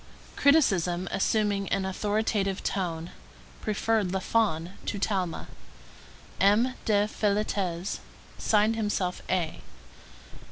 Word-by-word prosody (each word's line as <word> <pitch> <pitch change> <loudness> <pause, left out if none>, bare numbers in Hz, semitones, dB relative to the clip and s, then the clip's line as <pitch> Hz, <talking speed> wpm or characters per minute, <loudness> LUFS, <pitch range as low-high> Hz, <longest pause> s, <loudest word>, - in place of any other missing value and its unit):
Criticism, 190 - +3
assuming 200 -1 +1
an 195 -1 0
authoritative 205 0 0
tone, 170 -3 -2 0.5
preferred 215 -1 +1
Lafon 190 -3 0 0.2
to - - -1
Talma. 190 -4 -1 0.9
M. 210 +7 +4
de 205 -1 +3
Féletez 200 -4 -1 0.4
signed 215 +1 +3
himself 205 -4 -1
A. 175 -4 -1
200 Hz, 85 wpm, -28 LUFS, 185-215 Hz, 0.9 s, M